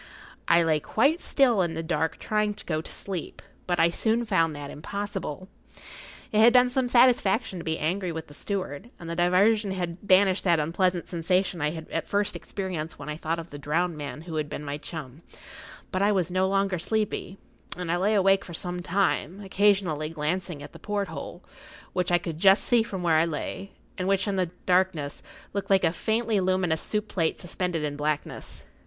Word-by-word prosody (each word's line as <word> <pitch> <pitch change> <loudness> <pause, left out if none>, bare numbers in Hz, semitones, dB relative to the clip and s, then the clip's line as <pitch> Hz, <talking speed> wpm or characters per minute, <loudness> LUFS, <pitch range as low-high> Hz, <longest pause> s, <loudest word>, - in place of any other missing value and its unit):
I 170 0 +5
lay 160 -2 +2
quite 280 - +2
still 245 -8 +3
in 170 -2 -1
the 165 - -3
dark 160 -1 -1
trying 210 -1 0
to - - -11
go 155 -2 -1
to - - -10
sleep, 190 -5 -5 0.3
but 175 -1 0
I 170 - +5
soon 225 +6 +1
found 165 -7 +2
that 145 -1 -7
impossible. 195 0 -5 0.8
It 215 - +2
had 235 +2 +7
been 250 0 +5
some 260 -1 +1
satisfaction 240 -5 +3
to - - -6
be 160 -1 -1
angry 180 +3 -1
with 160 -1 -5
the 145 - -15
steward, 190 +3 -4
and 170 - -9
the 170 - -3
diversion 195 +5 +3
had 180 +1 -5
banished 190 0 +5
that 175 -3 +4
unpleasant 175 +3 0
sensation 180 0 0
I 150 - +2
had 160 0 -7
at - - -2
first 205 0 0
experienced 180 -5 -4
when 145 - -8
I 150 - -3
thought 160 +1 -2
of 165 0 -8
the 145 - -8
drowned 165 +4 0
man 150 0 -6
who 165 -1 -6
had 150 -1 -2
been 150 0 -6
my 145 +1 -4
chum; 150 -2 -8 0.7
but 185 - -1
I 205 +1 +4
was 185 -4 0
no 185 +1 +2
longer 195 -2 +1
sleepy, 200 0 -2 0.4
and 180 -2 -3
I 175 - +2
lay 205 +4 +2
awake 195 0 +4
for 170 - -8
some 180 +1 -4
time, 185 0 0
occasionally 190 -6 +2
glancing 165 0 -3
at - - -11
the - - -11
porthole, 205 -1 -4 0.5
which 180 -1 0
I 175 - +6
could 165 -2 -5
just 195 +3 +6
see 240 -2 +4
from 195 -5 -4
where 165 -2 +4
I 160 - +4
lay, 170 +4 -5 0.3
and 185 - -1
which, 195 +1 +2
in 200 - 0
the 185 -3 0 0.2
darkness, 180 -6 +1 0.3
looked 200 0 -3
like 195 -1 +4
a 165 - +4
faintly 220 +2 +1
luminous 185 -3 +1
soup 210 0 -2
plate 165 -5 0
suspended 175 -2 -2
in 145 -1 -2
blackness. 150 0 -3
180 Hz, 200 wpm, -27 LUFS, 160-200 Hz, 0.8 s, had